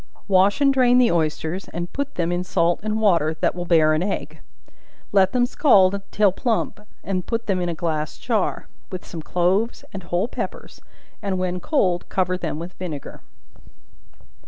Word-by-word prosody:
Wash 195 +5 +3
and 275 -1 +5
drain 250 -2 +4
the 250 -2 +5
oysters, 160 +2 -1
and 175 +1 -6
put 280 0 -3
them 170 -1 0
in 175 +1 -1
salt 170 -1 +1
and 215 +1 -1
water, 170 -7 +2
that - - +1
will 175 0 -5
bear 160 -3 +4
an 155 - +1
egg; 195 +2 -3 0.7
let 195 -1 +4
them 245 -1 +3
scald 200 -8 +4
till 205 -2 +3
plump, 225 +2 -1 0.2
and 185 -2 -3
put 230 0 -2
them 190 -3 0
in 175 - -1
a 170 - -3
glass 155 -2 -2
jar, 220 -5 -1 0.2
with 185 -1 -6
some 165 - -7
cloves 185 +8 0
and 195 - -5
whole 175 +3 -1
peppers, - - -6 0.4
and 195 -2 -2
when 180 0 -2
cold 185 - 0
cover 185 -1 0
them 170 -4 -4
with 170 +3 -7
vinegar. 160 -6 -6
185 Hz, 175 wpm, -22 LUFS, 175-210 Hz, 0.7 s, and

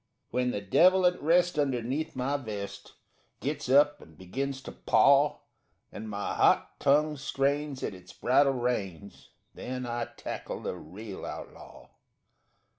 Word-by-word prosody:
_ - - -49 0.3
When 125 0 +1
the 105 - -2
devil 185 - +5
at 180 0 +2
rest 175 +1 +3
underneath 135 +3 -1
my 130 +3 -1
vest 105 -7 -6 0.5
Gets 145 -1 -3
up 145 +2 +4
and 80 -2 -16
begins 135 +9 -4
to - - -7
paw 140 +1 +4 0.5
And 110 +1 -7
my 100 -1 -3
hot - - +2
tongue 150 +2 +3
strains 140 0 -1
at - - -2
its 90 -1 -13
bridle 140 -1 +3
reins, 100 - -3 0.2
Then 125 0 -5
I 120 -1 -2
tackle - - -5
the - - -3
real 95 +5 -9
outlaw. - - -9
130 Hz, 140 wpm, -29 LUFS, 105-145 Hz, 0.5 s, devil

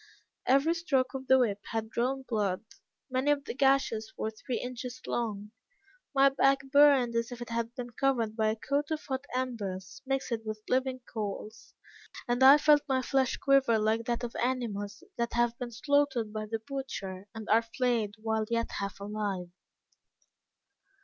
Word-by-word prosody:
Every 275 +6 +4
stroke 285 -7 0
of 265 -1 -6
the 260 - +7
whip 215 -6 +1
had 225 -1 -3
drawn 265 +4 -1
blood; 205 -3 -1 0.5
many 260 +2 +1
of 290 -1 +2
the - - -4
gashes 265 -5 +2
were 220 - -2
three 240 +3 -4
inches 250 0 -6
long; 210 -3 -3 0.6
my 275 0 +6
back 275 0 +3
burned 280 -5 +5
as 230 +1 0
if 245 - -7
it 240 - -7
had 230 +1 -2
been 245 -1 -6
covered 235 -4 0
by 220 -1 +1
a 215 - 0
coat 280 +6 -1
of 310 -1 -3
hot 265 0 -3
embers, 205 -8 -4
mixed 270 -2 -1
with 215 -1 -6
living 255 0 0
coals; 215 -1 -6 0.5
and 245 +1 0
I 270 +2 +10
felt 300 0 +5
my 260 -1 +1
flesh 265 -1 +1
quiver 275 -4 +4
like 220 +1 +1
that 240 0 -1
of 235 - -5
animals 235 - -2
that 235 0 -1
have 240 0 +2
been 245 -1 -4
slaughtered 240 -1 +1
by 215 0 -4
the 225 +1 -2
butcher 200 -9 -5
and 220 -1 -7
are 225 +1 +6
flayed 230 -3 -1
whilst 220 0 -1
yet 230 0 0
half 200 0 -4
alive. 200 -3 -3
240 Hz, 170 wpm, -30 LUFS, 220-265 Hz, 0.6 s, I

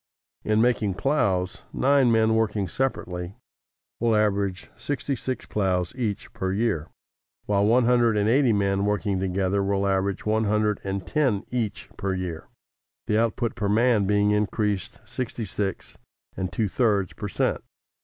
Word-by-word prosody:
In 110 +1 +2
making 110 -6 +1
plows, 100 -7 0
nine 135 -2 +3
men 110 0 +3
working 110 -3 +1
separately 90 -5 -3 0.6
will 115 -1 +2
average 100 -3 0
sixty 145 -1 -3
six 130 -1 -4
plows 90 -4 0
each 110 -6 -3
per 95 0 -2
year, 100 -6 -1 0.6
while 100 0 +2
one 120 +2 +4
hundred 120 -2 +3
and 105 0 +2
eighty 130 +1 +4
men 100 -1 +1
working 105 -2 0
together 95 +1 0
will 100 0 0
average 95 0 0
one 110 +1 +1
hundred 105 0 +1
and 95 -1 -3
ten 130 -10 +1
each 120 -4 -3
per 95 -1 -1
year, 90 -3 -5 0.6
the 105 0 +2
output 115 0 0
per 100 - -2
man 110 -1 +3
being 105 0 +3
increased 105 -2 -1
sixty 120 -2 -4
six 95 0 -4 0.4
and 95 -1 -3
two 110 -4 0
thirds 100 -4 +1
per 105 - -5
cent. 100 - -1
105 Hz, 150 wpm, -25 LUFS, 95-115 Hz, 0.6 s, one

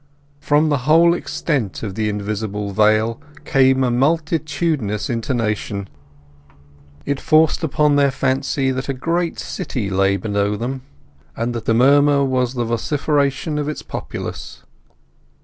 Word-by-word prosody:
From 150 +2 +2
the 145 -2 +1
whole 170 +2 +6
extent 140 - -2
of 100 -3 -4
the 105 +1 -1
invisible 105 0 -3
vale 110 +2 +2 0.2
came 130 -1 +3
a 125 - +1
multitudinous 150 -4 0
intonation; 110 -4 -2 1.2
it 140 -1 -1
forced 155 +1 +3
upon 150 -1 +2
their 140 -1 +4
fancy 135 +1 0
that 130 +1 -4
a 135 - -1
great 165 +5 -1
city 105 -7 -4
lay 95 +1 +2
below 100 +1 -1
them, 125 +5 -4 0.6
and 120 +1 -2
that 115 - -5
the 115 - +2
murmur 140 +3 +4
was 130 -1 0
the 120 -1 -1
vociferation 140 +5 -1
of 145 0 -2
its 150 - -5
populace. - - -7
130 Hz, 130 wpm, -20 LUFS, 110-145 Hz, 1.2 s, whole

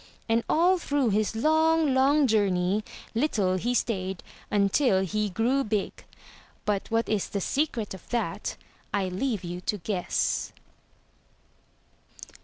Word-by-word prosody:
And 230 0 +2
all 355 +3 +4
through 285 -8 +1
his 215 +2 0
long, 315 +3 +3
long 275 +3 +4
journey 200 -3 +2 0.3
little 215 -7 +1
he 240 +6 -1
stayed 190 -6 -1 0.3
until 200 +1 +3
he 210 +3 -1
grew 240 +8 +1
big. 210 -3 -2 0.6
But 205 -2 -1
what 225 +1 +1
is 210 -3 -1
the 200 - -2
secret 240 - -1
of 190 - -12
that 240 -1 -2 0.3
I 195 -2 0
leave 210 +2 -2
you 175 +1 -5
to 210 - -1
guess. 180 0 -1
215 Hz, 125 wpm, -27 LUFS, 195-265 Hz, 0.6 s, all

